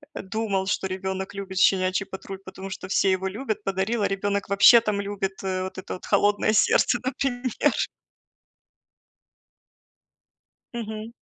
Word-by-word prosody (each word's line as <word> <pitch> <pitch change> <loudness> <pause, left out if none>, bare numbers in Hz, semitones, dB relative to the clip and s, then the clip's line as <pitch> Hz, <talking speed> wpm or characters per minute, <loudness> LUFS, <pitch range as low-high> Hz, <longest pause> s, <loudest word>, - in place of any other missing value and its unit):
думал, 195 -1 -2
что 190 0 -1
ребёнок 190 +1 -4
любит 190 -1 -4
"Щенячий 185 0 +3
патруль", 190 0 -8
потому 190 0 -8
что 185 - -6
все 195 0 +2
его 190 0 0
любят, 215 +2 -4
подарил, 195 +4 -1
а - - +3
ребёнок 200 0 -2
вообще 225 +4 +8
там 210 -3 -1
любит, 200 -1 -3
э, 185 -1 -1
вот 190 - -6
это 190 - -6
вот 185 - -8
"Холодное 205 +1 +2
сердце", 245 - +4
например. 255 -2 0 2.9
Мгм. 220 -1 -5
195 Hz, 135 wpm, -25 LUFS, 190-215 Hz, 2.9 s, вообще